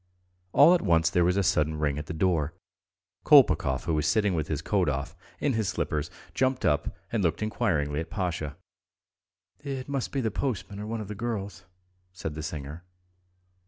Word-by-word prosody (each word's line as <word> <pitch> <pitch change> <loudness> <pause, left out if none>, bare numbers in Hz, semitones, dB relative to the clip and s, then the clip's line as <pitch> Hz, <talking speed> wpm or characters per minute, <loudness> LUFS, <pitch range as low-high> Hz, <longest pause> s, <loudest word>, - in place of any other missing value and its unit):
All 150 - +7
at 180 - +3
once 80 -1 +3
there 90 - +3
was 90 +2 +2
a 100 - +3
sudden 80 -3 +1
ring 75 -1 0
at 75 - -7
the - - -4
door. 80 -3 +1 0.7
Kolpakov, 65 -1 +5
who 85 - -1
was 75 -1 +1
sitting 105 +2 +2
with 80 -3 -1
his 75 0 -3
coat 95 -4 +1
off, 70 0 -3 0.2
in 140 - +1
his 110 -4 0
slippers, 75 +1 -2 0.2
jumped 130 0 +1
up 75 0 0
and 115 - 0
looked 85 +3 0
inquiringly 75 -9 0
at 80 0 -5
Pasha. 80 -6 -3 1.0
"It 135 -3 -5
must 140 -3 -2
be 140 - -1
the 110 -3 -1
postman 100 -5 -3
or 105 - -5
one 115 0 -3
of 105 - -7
the 105 - -5
girls," 100 -4 -4 0.5
said 80 -4 -5
the 80 - -6
singer. 75 +1 -6
90 Hz, 185 wpm, -27 LUFS, 75-110 Hz, 1.0 s, All